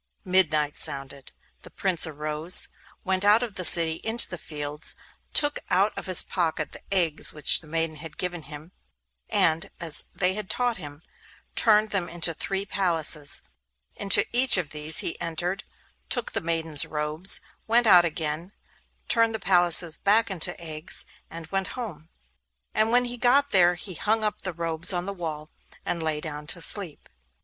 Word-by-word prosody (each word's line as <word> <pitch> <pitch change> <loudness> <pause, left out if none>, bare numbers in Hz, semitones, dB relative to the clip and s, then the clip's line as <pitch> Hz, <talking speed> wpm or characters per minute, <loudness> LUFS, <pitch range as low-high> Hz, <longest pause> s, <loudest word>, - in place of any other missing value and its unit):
Midnight 155 -6 +1
sounded. 135 0 -3 0.3
The - - -12
Prince 180 -3 +1
arose, 155 +3 -1 0.3
went 190 0 -2
out 210 +4 +4
of 230 -4 -6
the 185 - -6
city 165 -1 +5
into 225 +1 +1
the 175 - -8
fields, 150 0 -2 0.4
took 290 -1 +3
out 195 +4 +1
of - - -8
his 185 -2 +5
pocket 160 -4 -3
the - - -12
eggs 170 -6 +1
which 150 -2 +4
the 160 - -16
maidens 165 -1 -2
had 160 0 -9
given 175 -2 -4
him, 150 +3 -11 0.6
and, 165 +4 0
as 165 -3 -3
they 185 0 +1
had 210 -1 -6
taught 245 -2 -1
him, 145 -2 -11 0.5
turned 215 -1 +3
them 180 -4 -1
into 170 0 +1
three 195 +5 -5
palaces. 165 -7 +2 0.5
Into 195 - +4
each 255 -2 +8
of 170 -5 -4
these 150 +1 0
he - - -2
entered, 175 +4 -4 0.4
took 245 - -2
the - - -2
maidens' 165 -2 +1
robes, 155 +4 +2 0.3
went 235 +2 +2
out 180 -5 +6
again, 165 +2 -4 0.5
turned 230 -1 +1
the - - -4
palaces 175 -3 +3
back 210 +1 +2
into 175 -1 -1
eggs, 155 -1 -3 0.2
and 165 0 -9
went 195 -1 -2
home. 170 -10 -8 0.6
And 215 +1 +1
when 245 +1 +2
he 245 0 -5
got 270 +4 +1
there 175 -2 +3
he 185 +1 -8
hung 215 +6 -1
up 210 - -3
the 185 - -5
robes 165 +1 -1
on 175 0 -3
the 200 - -5
wall, 155 -4 -7 0.3
and 170 -1 -3
lay 155 -1 -2
down 150 -1 -8
to 175 - -5
sleep. 190 -7 +2
175 Hz, 170 wpm, -24 LUFS, 155-200 Hz, 0.6 s, each